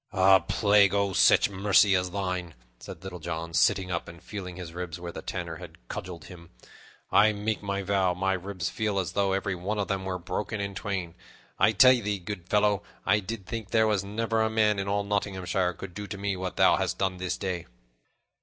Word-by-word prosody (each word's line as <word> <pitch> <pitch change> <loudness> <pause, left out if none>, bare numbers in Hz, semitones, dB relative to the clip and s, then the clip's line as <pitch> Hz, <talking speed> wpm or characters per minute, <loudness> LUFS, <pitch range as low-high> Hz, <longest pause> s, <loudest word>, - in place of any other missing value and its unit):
"A 95 -1 +6
plague 100 -2 +3
o' 100 -1 +1
such 95 - +5
mercy 100 +1 +4
as 90 0 0
thine!" 90 -3 -3 0.2
said 85 - -10
Little 90 -2 -7
John, 85 0 -5
sitting 95 +2 +2
up 85 - -2
and 85 - -11
feeling 95 -2 -7
his 85 -2 -8
ribs 90 -1 -5
where 85 0 -6
the - - -7
Tanner - - -5
had - - -13
cudgeled 90 -2 -6
him. 85 -2 -12 0.6
"I 110 +1 +5
make 105 +1 -2
my 100 -1 -2
vow, 95 -2 +1
my 95 +1 0
ribs 95 -2 -4
feel 105 -2 -2
as 90 -3 -1
though 100 0 +1
every 95 0 -1
one 95 +4 -3
of 100 - -2
them 95 -1 -1
were 95 -1 -3
broken 95 +5 -4
in 100 0 -3
twain. 95 -4 -4 0.5
I 110 - +4
tell 130 +5 +8
thee, 105 -5 -1
good 90 -1 -7
fellow, 105 -1 +3 0.2
I 105 +3 +4
did 105 0 -6
think 110 0 -5
there 110 +1 +3
was 105 -3 +1
never 110 +2 -1
a 110 - +2
man 105 -2 +2
in 100 - -3
all 100 +1 0
Nottinghamshire 95 -3 -1
could 90 0 -9
do 105 +3 -6
to 100 - -6
me 100 0 -2
what 95 -1 -4
thou - - +5
hast - - -1
done 95 -1 -1
this 90 0 -3
day." 90 -4 -4
95 Hz, 210 wpm, -27 LUFS, 90-105 Hz, 0.6 s, tell